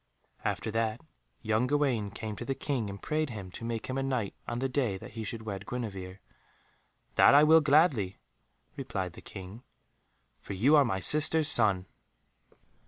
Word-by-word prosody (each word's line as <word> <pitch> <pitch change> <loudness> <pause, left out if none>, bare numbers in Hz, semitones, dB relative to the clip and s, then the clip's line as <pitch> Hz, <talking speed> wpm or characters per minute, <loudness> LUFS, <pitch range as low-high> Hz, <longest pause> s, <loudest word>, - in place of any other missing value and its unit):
After 110 - -2
that 115 0 -1 0.4
young 110 +3 +1
Gawaine 130 -7 0
came 110 +1 -6
to - - -6
the 135 +2 -3
King, 125 -8 -3
and 100 0 -8
prayed 155 +4 -2
him 100 -6 -8
to 115 - -9
make 115 -1 -4
him 130 +1 -3
a - - -1
Knight 130 -7 -2
on 120 - -3
the 135 +2 -1
day 125 -7 -1
that - - -11
he 110 +1 -6
should 110 +1 -6
wed 100 -2 -6
Guenevere. 100 -6 -6 0.9
"That - - +6
I 145 - +7
will 160 +1 +6
gladly," 140 - +2 0.6
replied 90 -3 -4
the - - -12
King, 95 +3 -10 0.8
"for - - -8
you 125 +11 +4
are 145 -2 +5
my 95 -5 -2
sister's 155 - +5
son." 100 -8 +4
115 Hz, 170 wpm, -29 LUFS, 100-135 Hz, 0.9 s, I